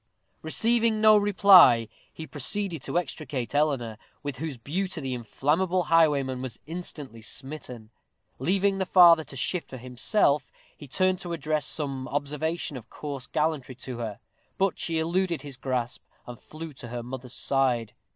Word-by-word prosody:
Receiving 225 Hz, +6 st, +3 dB
no 215 Hz, 0 st, +7 dB
reply, 195 Hz, -, +6 dB, 0.2 s
he 160 Hz, -, -8 dB
proceeded 165 Hz, +3 st, -2 dB
to -, -, -2 dB
extricate 145 Hz, -8 st, -3 dB
Eleanor, 135 Hz, -7 st, 0 dB, 0.2 s
with 145 Hz, -2 st, -4 dB
whose 155 Hz, -3 st, -5 dB
beauty 175 Hz, +9 st, -3 dB
the 135 Hz, -3 st, -3 dB
inflammable 160 Hz, -, 0 dB
highwayman 140 Hz, -6 st, +3 dB
was 130 Hz, -3 st, -6 dB
instantly 150 Hz, -7 st, -7 dB
smitten. 125 Hz, -3 st, -6 dB, 0.5 s
Leaving 195 Hz, +7 st, +1 dB
the 190 Hz, -, -1 dB
father 170 Hz, -4 st, +7 dB
to 140 Hz, -, -10 dB
shift 170 Hz, +7 st, -1 dB
for 130 Hz, -, -8 dB
himself, 135 Hz, -, +1 dB, 0.2 s
he 145 Hz, -, -12 dB
turned 185 Hz, +6 st, +1 dB
to 175 Hz, -1 st, -5 dB
address 155 Hz, -2 st, -1 dB
some 135 Hz, -4 st, -3 dB
observation 150 Hz, +1 st, -2 dB
of 115 Hz, -2 st, -12 dB
coarse 140 Hz, -3 st, -6 dB
gallantry 150 Hz, -5 st, -1 dB
to 125 Hz, -1 st, -7 dB
her; 110 Hz, -4 st, -5 dB, 0.4 s
but 195 Hz, 0 st, 0 dB
she 165 Hz, -1 st, -1 dB
eluded 170 Hz, +1 st, 0 dB
his 140 Hz, -2 st, -8 dB
grasp, 125 Hz, -2 st, -3 dB, 0.2 s
and 120 Hz, -1 st, -9 dB
flew 155 Hz, 0 st, -9 dB
to 125 Hz, -2 st, -9 dB
her 120 Hz, 0 st, -5 dB
mother's 125 Hz, 0 st, -7 dB
side. 125 Hz, -5 st, 0 dB
150 Hz, 150 wpm, -26 LUFS, 130-175 Hz, 0.5 s, no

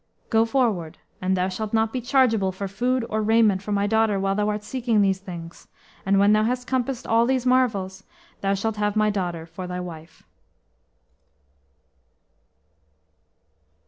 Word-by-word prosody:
"Go 225 Hz, -1 st, +4 dB
forward. 220 Hz, -, 0 dB, 0.2 s
And 185 Hz, +1 st, +1 dB
thou 180 Hz, 0 st, +1 dB
shalt 205 Hz, +3 st, -5 dB
not 225 Hz, 0 st, +1 dB
be 255 Hz, -, -2 dB
chargeable 235 Hz, -6 st, +2 dB
for 195 Hz, +2 st, -5 dB
food 245 Hz, +5 st, -1 dB
or 215 Hz, 0 st, -1 dB
raiment 215 Hz, -3 st, +3 dB
for 210 Hz, -, -6 dB
my 200 Hz, 0 st, +1 dB
daughter 220 Hz, -1 st, +2 dB
while 195 Hz, 0 st, 0 dB
thou 210 Hz, +1 st, 0 dB
art 210 Hz, 0 st, -3 dB
seeking 230 Hz, -2 st, +1 dB
these 195 Hz, -1 st, +1 dB
things; 170 Hz, -3 st, -10 dB, 0.4 s
and 195 Hz, 0 st, +3 dB
when 200 Hz, +1 st, +5 dB
thou 215 Hz, -, +4 dB
hast 250 Hz, +2 st, -1 dB
compassed 255 Hz, 0 st, -2 dB
all 230 Hz, +1 st, +3 dB
these 260 Hz, -1 st, 0 dB
marvels, 205 Hz, -7 st, +1 dB, 0.4 s
thou 195 Hz, 0 st, +1 dB
shalt 215 Hz, +2 st, -2 dB
have 210 Hz, 0 st, 0 dB
my 215 Hz, 0 st, +3 dB
daughter 175 Hz, -5 st, -3 dB
for 180 Hz, +2 st, -8 dB
thy 180 Hz, 0 st, -4 dB
wife." 165 Hz, -2 st, -9 dB
210 Hz, 160 wpm, -24 LUFS, 190-230 Hz, 0.4 s, when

